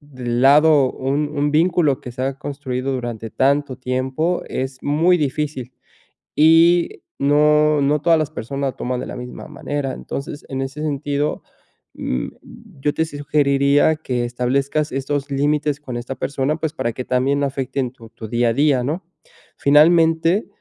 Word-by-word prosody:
lado 135 +3 +4
un 140 +3 -1
un 145 +1 +1
vínculo 155 -3 +2
que 125 - -8
se 125 - -6
ha 135 +1 -1
construido 135 -3 -4
durante 120 -3 -5
tanto 140 -1 +1
tiempo 130 +7 -1
es 130 0 -4
muy 165 +5 +3
difícil 145 -4 -3 0.6
y 165 +3 +4 0.2
no 150 +1 +3
no 145 +2 +2
todas 165 0 +4
las 155 -1 -1
personas 140 -2 -4
toman 125 0 -3
de - - -6
la - - -7
misma 125 +3 -8
manera. 145 -2 -4
Entonces, 145 +1 -7
en 135 0 -3
ese 135 +3 -5
sentido, 145 -1 -2 0.5
mm, 60 -1 -3 0.5
yo 145 +1 0
te 160 - +1
sugeriría 145 0 +2
que 125 -5 -2
establezcas 135 +5 -1
estos 135 +1 -2
límites 145 +1 0
con 130 -5 -6
esta 120 +2 -5
persona, 140 +2 -1
pues, 160 -1 -3
para 120 -7 -2
que 125 +3 -6
también 130 +3 +1
no 140 - +1
afecten 135 -1 -3
tu 115 -3 -15
tu 115 -1 -9
día 120 +1 +1
a - - -1
día, 140 -2 +2
¿no? 160 +7 -3 0.5
Finalmente, 165 +5 +4
140 Hz, 155 wpm, -20 LUFS, 130-150 Hz, 0.6 s, lado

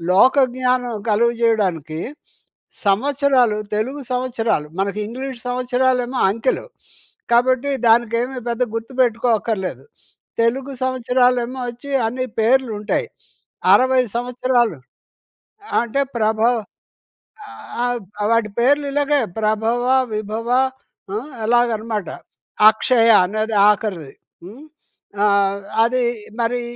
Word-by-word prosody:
లోకజ్ఞానం 250 +2 +3 0.2
కలుగజేయడానికి 210 -9 +1 0.9
సంవత్సరాలు, 255 +1 +2 0.2
తెలుగు 260 +7 -2
సంవత్సరాలు. 235 -10 -1
మనకి 200 +1 -1
ఇంగ్లీష్ 255 +1 -6
సంవత్సరాలేమో 250 0 0
అంకెలు. 230 - -1 0.7
కాబట్టి, 255 +3 +2 0.2
దానికేమీ 235 +3 +2
పెద్ద 235 +1 -1
గుర్తుపెట్టుకో 240 0 0
అక్కర్లేదు. 205 -4 -4 0.6
తెలుగు 265 +4 0
సంవత్సరాలేమో 250 0 +1
ఒచ్చి 245 +4 -11 0.2
అన్ని 255 +3 -3
పేర్లుంటాయి. 230 - +1 0.7
60 260 0 +4
సంవత్సరాలు 245 - 0 1.0
అంటే, 240 +4 -1 0.2
ప్రభవ్ 220 +2 +2 1.3
ఆబ్ 240 -5 -2 0.3
వాటి 230 -2 +2
పేర్లిలాగే 285 +2 +2 0.2
ప్రభవ, 220 +3 0 0.3
విభవ 215 +2 -4 0.6
హ్మ్, 245 +9 -5
అలాగనమాట. 225 -4 0 0.6
అక్షయ 230 +1 +2 0.2
అనేది 215 +3 -2
ఆఖరిది. 190 -9 -2 0.3
హ్మ్, 220 +11 -11 0.6
ఆహ్, 200 -1 +2 0.2
అదీ 250 +1 +1 0.4
మరీ 240 +1 0
235 Hz, 85 wpm, -20 LUFS, 220-255 Hz, 1.3 s, 60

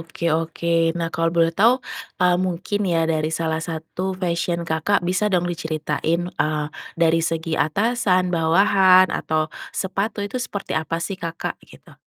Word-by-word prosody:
oke 165 +1 -8
oke, 165 +1 0
nah 165 -1 -2
kalau 165 0 +1
boleh 165 0 +2
tau, 235 +8 +3 0.3
eee, 180 0 +3
mungkin 185 +2 -1
ya 165 -2 +2
dari 155 -1 0
salah 160 0 -1
satu 165 +3 -4
fashion 170 -1 -1
Kakak 165 +4 0
bisa 185 +4 +1
dong 180 -3 +1
diceritain, 160 -1 -1
eee, 150 -1 -1 0.3
dari 165 0 +3
segi 165 0 -2
atasan, 185 +1 +1
bawahan, 185 +2 +5
atau 155 0 -1 0.2
sepatu 200 +2 -2
itu 250 +5 -4
seperti 205 -5 -5
apa 160 +1 -1
sih 190 +2 -5
Kakak 165 0 -4
gitu? - - -17
170 Hz, 150 wpm, -22 LUFS, 165-185 Hz, 0.3 s, bawahan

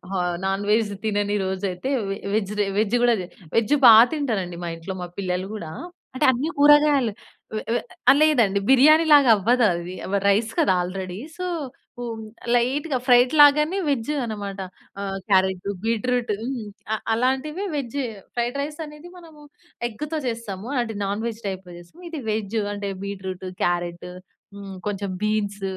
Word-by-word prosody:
ఆహ్, 180 -1 0
non 195 +1 -1
veg 215 -1 +2
తినని 205 -1 0
రోజైయితే 190 +3 -3 0.2
వె 195 - -2 0.2
వెజ్ 210 -2 0
డే, 205 - +3
వెజ్ 215 +2 +1
కూడా 240 -1 +5
జే 180 - -7 0.3
వెజ్జు 230 +5 +3
బాగా 225 0 +10
తింటానండి 215 - -2
మా 170 - -3
ఇంట్లో. 165 +3 -7
మా 180 - -4
పిల్లలు 185 -1 -2
కూడా. 165 -7 -7 0.4
అంటే - - +1
అన్ని 260 +6 -2
కూరగాయలు. 290 -4 +5 0.4
వె 215 - -3
వె - - 0 0.4
లేదండి, 235 -11 +4
బిర్యానీలాగా 295 0 +6
అవ్వదది. 195 -5 +1 0.2
వ - - +3
రైస్ 215 +3 +2
కదా! 190 - +4
ఆల్రెడీ. 185 +1 -5 0.2
సో, 365 - -3 0.5
హ్మ్, 230 -2 -5 0.3
లైట్‌గా 265 +4 +1
ఫ్రైడ్ 245 0 +6
లాగానే 300 +5 +5
వెజ్జు 275 0 -1
అన్నమాట. 205 -3 -5 0.4
ఆహ్, 195 -1 -3
క్యారటు, 190 -1 +2 0.2
బీట్రూటు 230 0 0
హ్మ్. 245 -2 -4 0.3
అ - - +2 0.2
అలాంటివే 265 - -1
వెజ్, 275 -2 -4 0.4
ఫ్రైడ్ 240 +3 -1
రైసనేది 300 +2 -8
మనము 320 -4 -15 0.5
ఎగ్గుతో 300 +8 -4
చేస్తాము. 225 -4 -5
అలాంటి 235 -3 -1
నాన్ 200 +3 -2
వెజ్ 225 -1 -6
టైప్‌లో 190 -2 -6
చేస్తాం. 175 - -16
ఇది 320 -4 -6
వెజ్ 215 0 -2 0.2
అంటే 200 -1 -4
బీట్రూటు, 190 -2 -5
క్యారెటు, 175 0 -2 0.4
హ్మ్, 200 -1 -8
కొంచెం 200 -1 -3
బీన్స్, 205 -1 -1
220 Hz, 145 wpm, -23 LUFS, 195-265 Hz, 0.5 s, బాగా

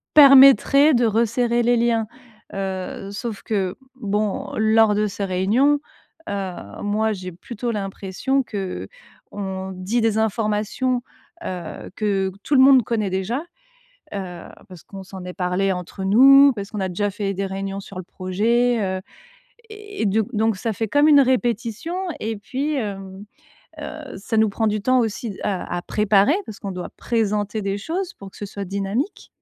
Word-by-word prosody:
permettrait 275 +1 +8
de 240 0 +3
resserrer 235 +2 +1
les 240 0 +3
liens. 230 -2 +1 0.5
Heu, 195 0 -4
sauf 210 0 -5
que 195 -4 -1 0.2
bon, 210 -4 -2
lors 220 -1 +4
de 210 0 +1
ces 200 0 -4
réunions, 215 +11 +2 0.5
heu, 195 -2 -3 0.3
moi, 215 +2 +1
j'ai 185 -2 -7
plutôt 235 +7 -6
l'impression 200 +6 -2
qu’on 190 - -7
dit 195 +6 -1
des 220 -1 +1
informations, 220 +3 0 0.4
heu, 175 -1 -6
que 195 -3 0
tout 290 - +1
le 260 - +7
monde 265 -2 +7
connaît 215 -3 -1
déjà, 205 - -2 0.7
heu, 180 -3 -6 0.3
parce 180 -4 -12
qu'on 195 -1 -10
s'en 190 -1 -10
est 180 - -6
parlés 190 +1 0
entre 180 +2 -6
nous, 275 +8 +7
parce 200 +1 -6
qu'on 210 - -4
a 190 - -1
déjà 205 +3 -1
fait 200 0 -3
des 195 +1 -2
réunions 195 +1 -4
sur 195 - -12
le 185 - -5
projet, 225 +7 0
heu 190 -1 -1 0.7
et 420 -1 -8
et - - +1
d 210 +3 +2
donc 220 -1 +1
ça 225 +2 -2
fait 220 +3 -2
comme 290 +6 +4
une 285 -2 +7
répétition 245 - -1 0.2
et 220 +1 -3
puis, 265 +8 -3
hem, 195 -5 -5 0.6
heu, 305 -4 -8
ça 205 +3 -4
nous 220 -1 +4
prend 220 +2 -1
du 210 0 -1
temps 255 +5 +3
aussi 220 -2 -2
à 190 -3 -2
à - - -3
préparer 210 +5 +3
parce 210 - -8
qu'on 195 - -5
doit 180 -1 -6
présenter 210 -2 -1
des 195 0 -1
choses 350 - -4
pour 195 -1 -11
que - - -16
ce 205 - -5
soit 200 0 -6
dynamique. 200 - -3
210 Hz, 165 wpm, -22 LUFS, 195-240 Hz, 0.7 s, permettrait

